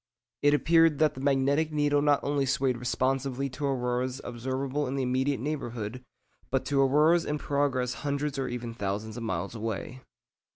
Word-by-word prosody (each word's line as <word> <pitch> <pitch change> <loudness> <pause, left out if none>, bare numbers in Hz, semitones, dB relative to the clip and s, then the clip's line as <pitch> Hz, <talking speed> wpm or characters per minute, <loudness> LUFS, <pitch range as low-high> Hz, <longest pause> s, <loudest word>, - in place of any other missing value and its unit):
It 145 0 +5
appeared 165 0 +4
that 155 0 +3
the 130 - -8
magnetic 140 +3 +2
needle 145 -1 +2
not 145 -1 +3
only 140 -1 0
swayed 135 -3 +1
responsively 135 +2 -1
to 140 +3 -3
auroras 125 0 -1
observable 130 +4 -2
in 130 - -3
the 135 - 0
immediate 130 +1 0
neighbourhood, 125 -4 -4 0.5
but 135 0 0
to 140 -1 +2
auroras 150 +5 +4
in 150 - -2
progress 140 -4 0
hundreds 140 -1 -2
or 135 - -1
even 120 -1 -5
thousands 105 0 -3
of 120 - -6
miles 115 0 -3
away. 115 +3 -5
135 Hz, 165 wpm, -28 LUFS, 125-145 Hz, 0.5 s, It